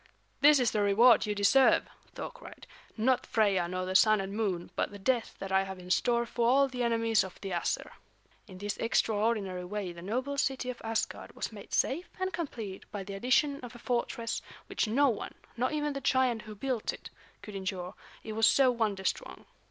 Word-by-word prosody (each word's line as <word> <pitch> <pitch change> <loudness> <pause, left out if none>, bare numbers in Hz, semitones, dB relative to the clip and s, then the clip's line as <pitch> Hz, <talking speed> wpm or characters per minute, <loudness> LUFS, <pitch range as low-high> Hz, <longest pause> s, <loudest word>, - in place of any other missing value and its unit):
"This 295 0 +7
is 245 -3 +2
the 210 - 0
reward 215 +4 +5
you 210 - -1
deserve!" 205 +7 +4 0.3
Thor - - -5
cried. - - -13 0.3
"Not 255 +3 +2
Freia 200 -5 +2
nor 185 0 -2
the 185 - -3
Sun 215 +3 +5
and 195 0 -4
Moon, 195 -5 -2
but - - 0
the 205 - -10
death 235 +4 0
that 195 - -6
I 190 0 +4
have 190 0 -5
in 180 0 -8
store 235 +3 +2
for 235 0 0
all 275 +2 +5
the 255 -2 -5
enemies 230 -2 +2
of 190 - -10
the 195 - -5
Æsir." 170 -1 -1 0.6
In 185 -3 -11
this 205 +1 -4
extraordinary 210 -4 0
way 195 0 -4
the 170 - -11
noble 255 +9 -2
city 265 -2 0
of 245 - -12
Asgard 225 0 -3
was - - -4
made - - -11
safe 335 +7 0
and 375 0 -2
complete 225 - -6
by 205 -2 -4
the 200 +1 -7
addition 260 +7 +2
of 245 -1 -10
a - - -8
fortress 235 -1 -2 0.2
which - - -1
no 275 +7 +3
one, 230 -6 -3 0.2
not 250 +2 0
even 295 -1 -1
the 275 - -5
giant 255 -3 +2
who 215 0 -10
built 250 +1 -2
it, - - -11 0.3
could 210 - -9
injure, 190 -2 -4 0.3
it 220 - -6
was 225 +1 +4
so 265 -2 +5
wonder 215 -5 -1
strong. - - -3
225 Hz, 205 wpm, -30 LUFS, 195-255 Hz, 0.6 s, This